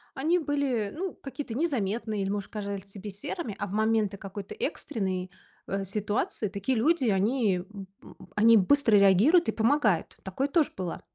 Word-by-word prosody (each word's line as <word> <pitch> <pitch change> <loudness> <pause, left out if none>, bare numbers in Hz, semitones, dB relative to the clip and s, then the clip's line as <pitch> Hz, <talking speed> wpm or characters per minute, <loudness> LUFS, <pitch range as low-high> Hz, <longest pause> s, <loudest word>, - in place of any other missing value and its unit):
они 320 +6 +2
были, 275 -9 -1
ну, 370 +3 -3
какие-то 275 -3 -7
незаметные 225 - -1
или, 195 - -2
может, 200 0 -3
казались 200 -2 -5
тебе 200 +1 -8
серыми, 210 - -5
а 205 - -3
в 190 - -8
моменты 215 -2 +1
какой-то 195 0 -7
экстренной, 195 - -3 0.4
э, 195 0 -2
ситуации 210 +2 -2
такие 200 +6 -1
люди, 300 +4 +2
они, 205 0 +2 0.8
м, 225 -2 +6
быстро 285 -5 +4
реагируют 205 - +5
и - - 0
помогают. 225 - +1
Такое 195 +9 -2
тоже 315 0 +2
было. 180 -3 -4
215 Hz, 150 wpm, -28 LUFS, 195-275 Hz, 0.8 s, м